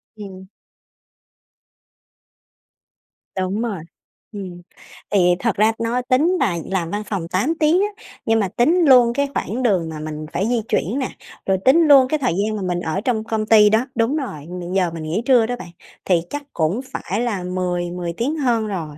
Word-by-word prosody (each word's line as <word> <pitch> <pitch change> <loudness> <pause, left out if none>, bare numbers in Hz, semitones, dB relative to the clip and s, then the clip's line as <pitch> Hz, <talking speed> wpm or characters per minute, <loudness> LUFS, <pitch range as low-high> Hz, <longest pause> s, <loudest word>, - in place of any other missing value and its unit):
Ừm. 190 -3 -10 2.9
Đúng 190 +3 -1
rồi. 210 -9 -3 0.5
Ừm, 185 -4 -8 0.5
thì 180 -3 +4
thật 230 -4 0
ra 215 +2 +3
nó 235 +2 -1
tính 290 +9 +2
là 190 -10 +1
làm 185 -4 -2
văn 210 +1 -3
phòng 190 -6 -4
8 205 - 0
tiếng 320 +5 +3
á, 415 +1 -4 0.2
nhưng 225 0 +2
mà 200 - +1
tính 325 - +2
luôn 245 -3 +6
cái 280 +1 0
khoảng 250 +2 -3
đường 185 -8 +1
mà 155 -1 -7
mình 155 0 -6
phải 195 +4 0
di 240 -1 +1
chuyển 230 - -1
nè, 260 - -2 0.4
rồi 190 -1 +2
tính 265 +5 +6
luôn 270 -3 +7
cái 310 +3 -1
thời 250 -10 0
gian 210 +4 -1
mà 210 - -4
mình 180 -2 -1
ở 180 +3 -2
trong 225 -2 -1
công 220 -1 -2
ty 215 -1 +6
đó 220 +4 +2
đúng 230 +5 +1
rồi, 155 - -5
mình 175 +2 -5
giờ 180 -3 +1
mình 165 -1 -7
nghỉ 160 +8 -2
trưa 245 -4 +5
đó 245 - -2
bạn, 240 - -10 0.4
thì 175 -3 +2
chắc 290 0 -5
cũng 175 +9 0
phải 205 +6 -3
là 210 -7 -2
mười 180 -1 -2
mười 175 -1 -4
tiếng 275 +7 -1
hơn 235 -6 +1
rồi. 160 -7 -5
215 Hz, 195 wpm, -20 LUFS, 180-250 Hz, 2.9 s, luôn